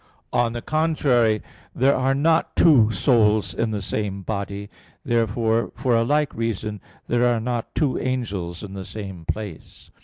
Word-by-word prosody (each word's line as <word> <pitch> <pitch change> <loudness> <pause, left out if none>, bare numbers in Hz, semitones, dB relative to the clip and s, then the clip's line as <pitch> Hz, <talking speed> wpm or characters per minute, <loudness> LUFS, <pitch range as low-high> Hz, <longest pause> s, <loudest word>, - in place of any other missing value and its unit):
On 120 -1 +2
the 120 - -5
contrary, 140 -9 +2 0.3
There 135 +3 +3
are 135 +1 +1
not 160 +3 +2
two 130 -10 +6
souls 110 -1 +2
in 115 -1 -1
the 105 -2 -3
same 100 -1 -3
body. 100 0 -4 0.4
Therefore 115 -1 +1
for 125 -3 +1
a 115 - +3
like 145 +2 +1
reason 110 -2 -3 0.3
there 120 0 +2
are 120 -1 +2
not 120 0 -3
two 145 -5 +1
angels 100 -10 -3
in 100 -2 -8
the 95 -1 -6
same 95 -4 -8
place. 105 -4 -6
115 Hz, 155 wpm, -23 LUFS, 105-125 Hz, 0.4 s, two